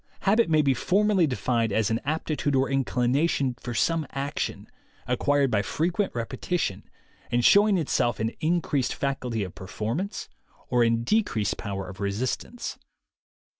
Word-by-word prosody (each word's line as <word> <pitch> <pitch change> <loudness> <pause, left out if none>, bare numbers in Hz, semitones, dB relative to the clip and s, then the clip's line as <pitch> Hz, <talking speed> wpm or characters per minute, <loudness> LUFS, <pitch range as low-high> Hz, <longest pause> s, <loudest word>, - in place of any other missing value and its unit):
Habit 215 +1 +3
may 155 -1 +4
be 135 -2 +3
formally 190 - +2
defined 120 -4 0
as 110 +1 +1
an 110 - +1
aptitude 150 -1 -1
or 135 +1 +2
inclination 135 +1 +1
for 120 -1 -5
some 165 +4 +1
action, 140 +1 -3 0.4
acquired 140 +2 +2
by 105 - +2
frequent 175 - -1
repetition, 120 - -3 0.4
and 120 0 +1
showing 205 -1 +6
itself 130 -7 0
in 110 0 0
increased 155 -5 0
facility 125 -5 -2
of 90 - -7
performance 110 - -4 0.4
or 120 -1 +3
in 115 0 +2
decreased 120 - +1
power 95 -2 -4
of 95 +2 -10
resistance. 115 - -3
130 Hz, 135 wpm, -26 LUFS, 115-165 Hz, 0.4 s, showing